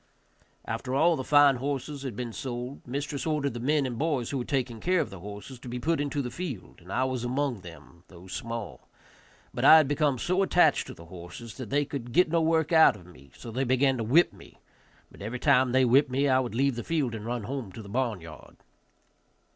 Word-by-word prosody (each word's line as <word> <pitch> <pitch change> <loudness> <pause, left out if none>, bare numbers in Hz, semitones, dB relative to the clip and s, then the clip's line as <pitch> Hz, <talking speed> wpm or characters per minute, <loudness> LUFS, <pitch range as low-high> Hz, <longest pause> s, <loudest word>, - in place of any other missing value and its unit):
After 125 +4 -3
all 165 +4 +4
the 130 - -4
fine 145 -1 +5
horses 140 +2 -4
had 130 -6 -5
been 120 0 -5
sold, 125 +1 -5
mistress 140 +3 -3
ordered 150 -4 0
the 120 - -5
men 145 +3 +1
and 120 -3 -4
boys 145 -6 -1
who 140 - -2
were 120 - -4
taking 125 -5 -2
care 185 +5 +1
of - - -2
the 95 - -9
horses 105 +7 -9
to 125 - -9
be 125 - -4
put 160 +3 0
into 145 0 -2
the 125 - -5
field, 140 - -7
and 90 +3 -12
I 130 - +1
was 130 -2 -2
among 125 -3 -1
them, 85 0 -14
though 90 -1 -14
small; 115 +2 -6 0.7
but - - -3
I 160 - +10
had 155 -3 +4
become 145 -1 +1
so 180 +9 0
attached 175 -6 +3
to - - -9
the 85 - -13
horses 90 +6 -10
that 130 -5 -7
they 145 +1 +1
could 130 -4 -6
get 180 +2 +4
no 165 -1 +3
work 160 -1 +1
out 160 -6 +7
of 90 -4 -14
me, 70 -6 -16
so 115 - -9
they 130 +4 -1
began 130 +1 +2
to 115 - -2
whip 145 +11 +4
me, - - -16 0.5
but - - -15
every 110 +5 -4
time 125 +1 +3
they 130 +1 +4
whipped 130 +3 +4
me 135 +3 +1
I 130 -1 +4
would 120 -3 -3
leave 135 0 +1
the 120 - -4
field 150 -8 -1
and 110 -2 -6
run 120 0 -3
home 125 -3 -5
to 110 - -9
the - - -11
barn 115 -3 -1
yard. 80 -2 -13
130 Hz, 235 wpm, -28 LUFS, 115-145 Hz, 0.7 s, I